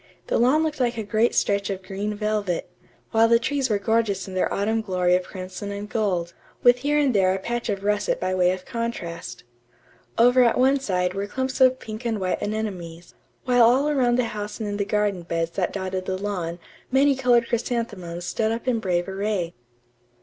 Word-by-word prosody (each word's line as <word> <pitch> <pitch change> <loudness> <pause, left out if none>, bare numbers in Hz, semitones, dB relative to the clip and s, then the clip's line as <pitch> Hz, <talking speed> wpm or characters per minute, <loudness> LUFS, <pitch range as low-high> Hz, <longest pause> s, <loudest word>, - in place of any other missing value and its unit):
The - - 0
lawn 265 +7 +4
looked 305 -2 -2
like 240 -2 0
a 220 - -2
great 215 +3 +1
stretch 200 0 +1
of 190 -1 -4
green 200 +3 -4
velvet, 210 -4 -1 0.4
while 225 0 +5
the 230 0 +5
trees 270 +2 -1
were 210 - +2
gorgeous 205 -2 0
in 190 - -8
their 185 - 0
autumn 220 +3 0
glory 180 -3 +1
of 180 - +2
crimson 185 +2 -7
and 200 +1 -5
gold, 185 -6 -1 0.3
with 245 0 +6
here 290 +3 +1
and 285 -4 +3
there 190 -2 +3
a - - -3
patch 240 +4 -3
of 200 -1 -2
russet 205 0 0
by 185 0 -1
way 180 -1 +3
of 185 0 -5
contrast. 205 -8 -5 0.7
Over 245 +2 +6
at 235 - +3
one 270 +2 +4
side 180 -7 -1
were 200 +1 -3
clumps 260 +4 -3
of 255 0 +6
pink 220 +2 -7
and 225 -3 -1
white 185 -1 -1
anemones; 185 -6 -5 0.3
while 245 -1 +4
all 255 +6 +5
around 250 -4 +2
the 250 - +2
house 210 -2 -5
and 220 - -3
in 205 0 -3
the 200 - -1
garden 205 -2 0
beds 165 -1 -2
that 180 0 -1
dotted 190 -1 -3
the 185 - -1
lawn 185 -4 -3 0.3
many 275 +1 +4
colored 245 -3 +3
chrysanthemums 205 -8 -3
stood 220 +5 0
up 230 +2 -4
in 240 -3 +2
brave 180 -4 -1
array. 195 -3 -2
210 Hz, 200 wpm, -24 LUFS, 185-235 Hz, 0.7 s, with